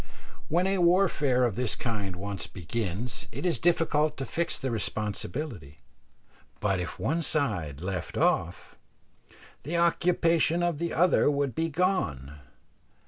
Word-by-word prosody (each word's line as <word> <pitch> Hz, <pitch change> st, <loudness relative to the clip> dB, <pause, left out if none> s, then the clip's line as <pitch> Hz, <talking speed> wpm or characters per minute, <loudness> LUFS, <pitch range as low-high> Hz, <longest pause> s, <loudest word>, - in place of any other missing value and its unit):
When 175 Hz, +4 st, +2 dB
a 195 Hz, 0 st, +1 dB
warfare 170 Hz, -8 st, +3 dB
of 120 Hz, -6 st, +1 dB
this 125 Hz, -1 st, 0 dB
kind 105 Hz, -6 st, -3 dB
once 100 Hz, +1 st, -4 dB
begins, 105 Hz, +4 st, -4 dB
it 140 Hz, +9 st, -5 dB
is 165 Hz, -9 st, +1 dB
difficult 155 Hz, -3 st, +2 dB
to 135 Hz, -, -3 dB
fix 170 Hz, +4 st, -1 dB
the 130 Hz, -2 st, -3 dB
responsibility; 105 Hz, -, -4 dB, 0.8 s
but 95 Hz, -3 st, +1 dB
if 90 Hz, -, -5 dB
one 165 Hz, +5 st, 0 dB
side 105 Hz, -, -1 dB
left 90 Hz, -2 st, -4 dB
off, 85 Hz, +1 st, 0 dB, 0.8 s
the 170 Hz, +4 st, -2 dB
occupation 170 Hz, -1 st, +2 dB
of 170 Hz, -4 st, 0 dB
the 170 Hz, 0 st, -2 dB
other 175 Hz, -2 st, +4 dB
would 140 Hz, -3 st, 0 dB
be 165 Hz, +1 st, -1 dB
gone. 110 Hz, -, -1 dB
135 Hz, 135 wpm, -28 LUFS, -, 0.8 s, other